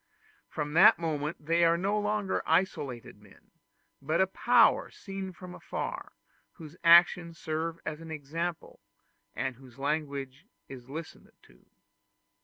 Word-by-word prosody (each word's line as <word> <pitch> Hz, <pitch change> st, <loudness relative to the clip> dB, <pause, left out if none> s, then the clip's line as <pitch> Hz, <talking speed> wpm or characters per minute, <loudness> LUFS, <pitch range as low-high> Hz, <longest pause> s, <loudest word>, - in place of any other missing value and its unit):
From 150 Hz, -1 st, -4 dB
that 175 Hz, +6 st, +7 dB
moment 155 Hz, -2 st, -3 dB
they 165 Hz, +2 st, +2 dB
are 170 Hz, 0 st, +4 dB
no 200 Hz, +4 st, 0 dB
longer 205 Hz, -2 st, -1 dB
isolated 130 Hz, -, -1 dB
men, 105 Hz, -2 st, -21 dB, 0.5 s
but 155 Hz, +4 st, -1 dB
a 190 Hz, -, +5 dB
power 190 Hz, -, +3 dB
seen 195 Hz, -1 st, -7 dB
from 180 Hz, 0 st, -11 dB
afar, -, -, -6 dB, 0.4 s
whose 160 Hz, -2 st, -12 dB
actions 170 Hz, 0 st, +5 dB
serve 160 Hz, +1 st, -3 dB
for -, -, -12 dB
an 160 Hz, +1 st, -10 dB
example, 160 Hz, +3 st, -5 dB, 0.6 s
and 130 Hz, -3 st, -3 dB
whose 130 Hz, -2 st, -16 dB
language 140 Hz, +1 st, -3 dB, 0.2 s
is 130 Hz, -2 st, -11 dB
listened 160 Hz, +3 st, -9 dB
to. -, -, -23 dB
160 Hz, 130 wpm, -29 LUFS, 145-175 Hz, 0.6 s, that